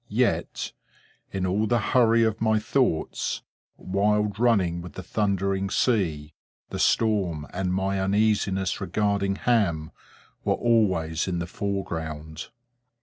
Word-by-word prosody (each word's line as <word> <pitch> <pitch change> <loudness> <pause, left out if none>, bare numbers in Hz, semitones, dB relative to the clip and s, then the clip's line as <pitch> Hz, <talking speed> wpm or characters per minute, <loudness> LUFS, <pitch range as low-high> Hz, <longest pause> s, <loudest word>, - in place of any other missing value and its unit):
Yet, - - 0 0.6
in 95 -1 -2
all 100 +4 +1
the 120 - +2 0.2
hurry 115 -2 +5
of 110 -1 0
my 110 -1 +3
thoughts, 110 - 0 0.3
wild 105 +2 0
running 95 -8 +2
with 85 -2 -9
the - - -7
thundering 100 -2 0
sea,—the 85 - -2
storm 95 -9 +1
and 90 0 -1
my 95 +1 0
uneasiness 100 -1 +1
regarding 100 -2 0
Ham, 95 -10 +1 0.5
were - - +2
always 95 -9 +1
in 90 -2 -1
the 85 - -2
foreground. 80 -5 -4
100 Hz, 115 wpm, -25 LUFS, 85-105 Hz, 0.6 s, hurry